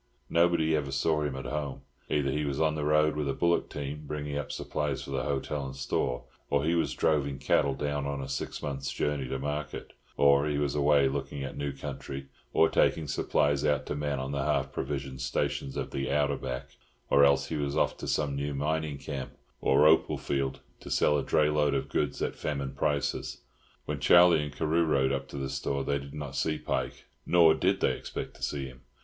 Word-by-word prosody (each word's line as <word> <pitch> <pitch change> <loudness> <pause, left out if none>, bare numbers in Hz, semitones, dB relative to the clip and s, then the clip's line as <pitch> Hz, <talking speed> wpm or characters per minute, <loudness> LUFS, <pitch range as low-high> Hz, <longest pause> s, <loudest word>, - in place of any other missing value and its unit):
Nobody 85 -2 +3
ever 70 -3 -2
saw 75 +3 +1
him 75 -3 -2
at 65 - -6
home. 70 -2 -3 0.3
Either 70 -2 +1
he 75 +2 -1
was 70 -2 -2
on 80 -1 +3
the 75 -1 -3
road 75 0 +3
with 75 -2 -1
a 70 - -1
bullock 85 0 +1
team, 75 +1 -5
bringing 75 -1 -4
up 70 0 -3
supplies 75 -2 -2
for - - -8
the 65 - 0
hotel 70 +1 -2
and 65 0 -6
store, 65 -2 -1 0.3
or 70 +1 +2
he 80 - +2
was 85 - 0
droving 70 -3 +1
cattle 70 0 +2
down 70 0 -2
on 70 0 -3
a 70 - -4
six 70 - -4
months' 70 -1 -3
journey 75 -3 -1
to 65 - -2
market; 75 +2 -4 0.2
or 70 +1 +5
he 75 -1 0
was 70 -1 0
away 70 -1 +4
looking 70 +1 -3
at 70 - -5
new 70 0 -2
country, 70 0 -6 0.3
or 80 - +5
taking 80 -1 +2
supplies 70 0 +1
out 75 -2 +1
to - - -3
men 75 -1 -1
on 65 +1 -3
the 70 -1 -1
half 70 -2 0
provisioned 70 -1 -4
stations 65 +1 -2
of - - -3
the 70 - -2
"outer 70 0 +2
back;" 65 -2 -6 0.3
or 70 - +6
else 70 -1 +4
he 80 - -2
was 70 0 -1
off - - +2
to - - -6
some 70 -2 0
new 70 0 -2
mining 75 +1 -1
camp 70 -1 -6 0.2
or 70 +3 +4
opal 80 +1 +4
field, 70 -1 -2 0.2
to - - -10
sell 75 - +3
a 75 - +2
dray 75 +2 +2
load 75 -2 +2
of - - -2
goods - - -1
at - - -2
famine 70 -3 -3
prices. 70 0 -1 0.4
When - - -3
Charlie 85 -2 +6
and 75 -1 -4
Carew 80 +4 +1
rode 70 -4 +2
up 70 0 -2
to 70 - -8
the 70 0 -2
store 70 0 -2
they 70 +1 0
did 70 +1 -9
not 75 -2 -6
see 75 +2 0
Pike, - - -3 0.2
nor 85 -2 +6
did 95 +3 +1
they - - +2
expect - - -6
to - - -20
see 70 -2 -2
him. 65 0 -11
70 Hz, 215 wpm, -29 LUFS, 70-75 Hz, 0.4 s, or